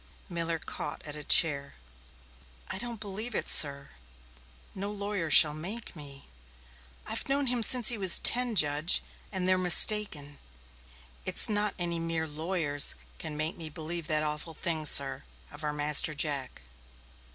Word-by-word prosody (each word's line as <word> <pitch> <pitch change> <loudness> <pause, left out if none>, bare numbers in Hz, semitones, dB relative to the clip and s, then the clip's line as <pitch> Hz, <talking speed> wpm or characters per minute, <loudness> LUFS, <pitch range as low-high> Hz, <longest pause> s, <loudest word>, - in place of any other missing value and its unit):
Miller 170 -2 -5
caught - - -8
at 150 -1 -8
a 150 - -10
chair. 140 -3 +3 0.9
"I - - -6
don't 235 0 -8
believe 215 +3 -8
it, - - -4
sir," 140 -2 +7
he 140 - -18
gasped. - - -26
"No 200 +2 -6
lawyer 200 -4 -6
shall 150 0 +5
make 190 +9 -8
me. 140 -3 -13 0.8
I've - - -7
known 280 +1 -1
him 245 -2 -2
since 240 +1 +4
he 235 - -3
was 190 -3 +5
ten, 245 -1 +6
Judge, 150 0 0 0.3
and 185 -2 -4
they're 185 0 +1
mistaken. 180 -5 +3 0.8
It's - - +4
not 210 -1 -3
any 170 -2 -4
mere 165 -1 -5
lawyers 155 -2 -3 0.2
can 155 -2 -7
make 155 +3 -4
me 160 -2 -7
believe 160 +2 -6
that 155 -2 -1
awful 150 +2 -5
thing, 160 -2 -2
sir, 135 -1 +4 0.3
of 145 +1 -13
our 150 - -4
Master 150 +1 0
Jack." 140 - -5
160 Hz, 155 wpm, -27 LUFS, 145-195 Hz, 0.9 s, sir